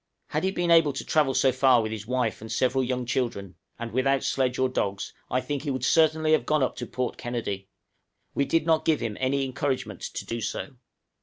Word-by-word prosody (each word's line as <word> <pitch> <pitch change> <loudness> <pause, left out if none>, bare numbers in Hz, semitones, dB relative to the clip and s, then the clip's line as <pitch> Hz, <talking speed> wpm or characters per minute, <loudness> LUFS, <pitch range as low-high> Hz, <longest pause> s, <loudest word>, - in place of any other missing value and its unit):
Had - - -1
he 190 - +2
been 175 -2 0
able 165 -4 +5
to 135 - -5
travel 145 -4 +2
so 135 - +4
far 130 -2 +4
with 110 - -3
his 110 -1 -6
wife 125 -4 -1
and 110 - -8
several 130 +1 +1
young 125 0 -2
children, 115 -7 -2 0.2
and 115 0 -5
without 135 +2 +1
sledge 130 -2 0
or 130 - +3
dogs, 100 -6 -2 0.2
I 130 - +1
think 145 -1 -3
he 135 -4 -2
certainly 155 +1 +3
would 155 - +7
have - - -16
gone 155 -3 +3
up 130 - -1
to 120 - -5
Port 125 +1 -3
Kennedy; 100 -5 -4 0.6
we 140 - +1
did 165 +1 +1
not 160 -1 +3
give 160 -2 +2
him 110 -3 -3
any 135 +1 +1
encouragement 130 +1 -3
to - - -5
do 115 0 -4
so. 110 +5 -4
130 Hz, 220 wpm, -26 LUFS, 120-145 Hz, 0.6 s, would